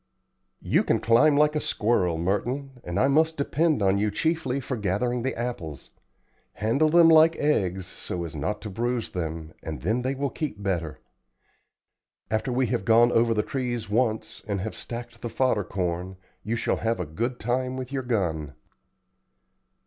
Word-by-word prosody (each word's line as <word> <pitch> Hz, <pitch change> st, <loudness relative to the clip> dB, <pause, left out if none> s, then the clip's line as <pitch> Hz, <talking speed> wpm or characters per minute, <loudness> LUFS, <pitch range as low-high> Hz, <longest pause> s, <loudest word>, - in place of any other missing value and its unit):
"You -, -, +2 dB
can -, -, +1 dB
climb 145 Hz, +6 st, +4 dB
like 150 Hz, +1 st, +4 dB
a -, -, +2 dB
squirrel, 95 Hz, -7 st, +1 dB
Merton, 125 Hz, +9 st, -2 dB
and 85 Hz, 0 st, -2 dB
I 135 Hz, -, +4 dB
must 160 Hz, +3 st, +3 dB
depend 150 Hz, -3 st, +1 dB
on 95 Hz, +1 st, +3 dB
you 105 Hz, +1 st, +1 dB
chiefly 160 Hz, 0 st, -1 dB
for 130 Hz, 0 st, -4 dB
gathering 120 Hz, +4 st, -1 dB
the 130 Hz, +2 st, -2 dB
apples. 100 Hz, -, -5 dB, 0.6 s
Handle 120 Hz, +9 st, +2 dB
them 170 Hz, +1 st, +7 dB
like 160 Hz, 0 st, +6 dB
eggs, 95 Hz, -11 st, 0 dB
so 90 Hz, -1 st, -5 dB
as 80 Hz, -2 st, -7 dB
not 105 Hz, +9 st, -3 dB
to 105 Hz, -, -5 dB
bruise 120 Hz, +3 st, -2 dB
them, 80 Hz, -2 st, -4 dB
and 80 Hz, -2 st, -6 dB
then 110 Hz, +8 st, +1 dB
they 130 Hz, +2 st, -1 dB
will 140 Hz, 0 st, -2 dB
keep 125 Hz, -11 st, -5 dB
better. 85 Hz, -5 st, -2 dB, 1.3 s
After 110 Hz, +4 st, 0 dB
we 130 Hz, +1 st, +2 dB
have 105 Hz, -, -1 dB
gone 115 Hz, +3 st, +5 dB
over 115 Hz, -1 st, +3 dB
the 105 Hz, -, +1 dB
trees 120 Hz, -7 st, -3 dB
once 110 Hz, -1 st, 0 dB
and 100 Hz, -2 st, -1 dB
have 110 Hz, +3 st, -4 dB
stacked 120 Hz, 0 st, -7 dB
the 120 Hz, -, -4 dB
fodder 120 Hz, -3 st, +1 dB
corn 90 Hz, 0 st, -3 dB, 0.2 s
you 110 Hz, +4 st, -2 dB
shall 115 Hz, -, 0 dB
have 115 Hz, -2 st, -1 dB
a 90 Hz, -, -2 dB
good 115 Hz, +11 st, -3 dB
time 130 Hz, +3 st, -1 dB
with 130 Hz, 0 st, -6 dB
your 135 Hz, -1 st, -1 dB
gun." 85 Hz, -, -2 dB
115 Hz, 170 wpm, -26 LUFS, 95-130 Hz, 1.3 s, them